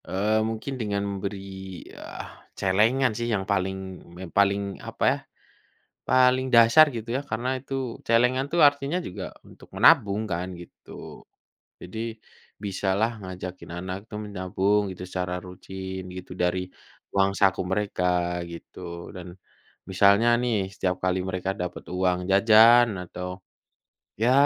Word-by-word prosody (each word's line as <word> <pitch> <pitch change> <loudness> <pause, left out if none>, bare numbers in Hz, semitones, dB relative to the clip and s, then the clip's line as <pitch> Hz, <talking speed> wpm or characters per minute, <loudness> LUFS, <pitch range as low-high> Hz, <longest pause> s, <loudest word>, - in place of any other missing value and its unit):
Eee, 105 +3 +1
mungkin 115 +4 -3
dengan 100 -2 -1
memberi, 100 0 -4 0.5
eee, - - -9 0.3
celengan 110 +7 +3
sih 120 +2 -3
yang 100 -4 0
paling 95 -1 -2 0.2
yang 90 -3 -8
paling, 100 0 +1
apa - - -5
ya, - - -3 0.9
paling 130 0 +4
dasar, 115 +5 +7
gitu 115 -3 -6
ya. - - -2
Karena 110 +3 -2
itu 135 -2 -4
celengan 125 +4 +3
tuh 170 +2 +1
artinya 145 +3 +2
juga 175 - -5 0.2
untuk - - -16
menabung 105 +2 +5
kan, 90 -2 -3
gitu. 85 - -12 0.6
Jadi 95 +5 -9 0.6
bisalah 100 +2 0 0.2
ngajakin 90 0 -7
anak 95 +2 -6
tuh 105 0 -5
menabung 100 0 0
gitu, 90 - -12
secara 90 -1 -3
rutin 95 +1 -7
gitu, 90 0 -9
dari 90 +1 0 0.4
uang 100 0 +3
saku 95 -2 +2
mereka, 95 0 -1 0.4
gitu. 85 0 -9
Dan, 90 -2 -9 0.6
misalnya 100 +4 +5
nih, 115 -6 0
setiap 90 -2 -2
kali 95 0 +1
mereka 95 +1 -3
dapat 90 0 -5
uang 90 0 0
jajan, 115 +4 +7
atau 90 +1 -6 0.9
ya 120 +2 +3
100 Hz, 130 wpm, -26 LUFS, 95-115 Hz, 0.9 s, dasar